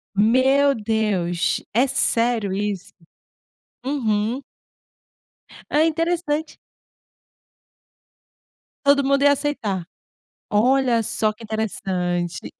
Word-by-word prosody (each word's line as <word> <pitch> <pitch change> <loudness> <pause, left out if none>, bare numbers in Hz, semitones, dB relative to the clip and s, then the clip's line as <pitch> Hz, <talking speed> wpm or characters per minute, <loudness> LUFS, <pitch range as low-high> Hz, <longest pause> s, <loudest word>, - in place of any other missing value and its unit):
Meu 265 +6 +4
Deus, 210 -6 0
é 245 +4 +4
sério 230 -6 0
isso. 200 -2 -3 0.9
Uhum. 240 -2 -1 1.3
É 305 +2 +3
interessante. 325 -1 -1 2.3
Todo 280 0 +5
mundo 275 +1 +2
ia 285 - +6
aceitar, 215 - -2 0.7
olha 245 +2 +3
só 215 0 0
que 225 +2 -14
interessante, 180 -6 -3
230 Hz, 75 wpm, -22 LUFS, 205-280 Hz, 2.3 s, ia